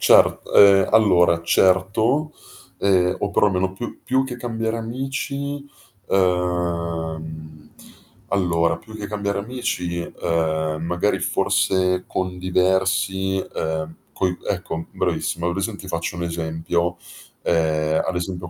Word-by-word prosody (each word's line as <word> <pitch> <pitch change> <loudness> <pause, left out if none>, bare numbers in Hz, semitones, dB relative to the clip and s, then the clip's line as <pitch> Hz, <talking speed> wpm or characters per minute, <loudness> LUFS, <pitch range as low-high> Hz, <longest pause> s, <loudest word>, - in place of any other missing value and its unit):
Cer - - +5
ehm, 100 -1 +7
allora, 90 -6 +4
certo. 100 - +2 0.5
Ehm, 90 -2 +3
o 100 - -1
perlomeno 95 -2 +2
più 110 +6 -7
più 130 +1 +2
che 125 -2 -5
cambiare 115 -1 -2
amici 135 +4 -4 0.4
ehm, 85 -4 -1 0.6
allora 85 -3 +1
più 110 -1 -13
che 105 -1 -5
cambiare 100 -1 -2
amici, 100 -7 -3
ehm, 80 -2 -1
magari 90 +4 0
forse 95 -1 +1
con 95 -1 -3
diversi 95 +1 +1
ehm, 80 -3 -3 0.2
coi 90 -1 -1
ecco, 80 - -2
mh, 80 - -6
bravissimo. 85 - -1
Hai 85 - 0
presente 100 +3 -3
ti 95 - -10
faccio 85 0 -3
un 85 - -3
esempio: 85 +1 -2 0.5
ehm, 80 -2 +1
ad 95 - -2
esempio, 90 0 -4
90 Hz, 120 wpm, -22 LUFS, 85-100 Hz, 0.6 s, ehm